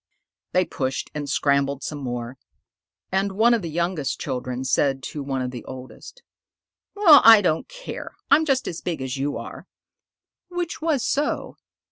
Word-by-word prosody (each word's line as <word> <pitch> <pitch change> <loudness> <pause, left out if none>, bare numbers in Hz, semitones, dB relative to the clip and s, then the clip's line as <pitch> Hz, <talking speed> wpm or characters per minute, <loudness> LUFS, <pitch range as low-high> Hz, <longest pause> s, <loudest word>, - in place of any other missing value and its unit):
They 185 0 +3
pushed 130 -4 -3
and 145 -1 -4
scrambled 140 -1 +1
some 150 - -4
more, 125 -1 -5 0.7
and 195 +1 0
one 225 +4 +4
of 235 - +1
the 170 - -5
youngest 170 -3 -2
children 125 -1 -4
said 135 +1 +1
to 150 - -5
one 135 -2 -2
of 125 - -3
the 120 -3 -8
oldest, 130 - -11 0.7
"Well, 345 -8 +8
I 225 -1 +10
don't 160 -3 0
care. - - -8 0.2
I'm 295 +3 +6
just 270 -4 0
as 170 - -5
big 165 -6 -3
as 130 +1 -4
you 140 +2 -2
are" - - -9 0.8
(which 350 -2 -4
was 310 -6 0
so). 290 +2 -1
155 Hz, 160 wpm, -23 LUFS, -, 0.8 s, I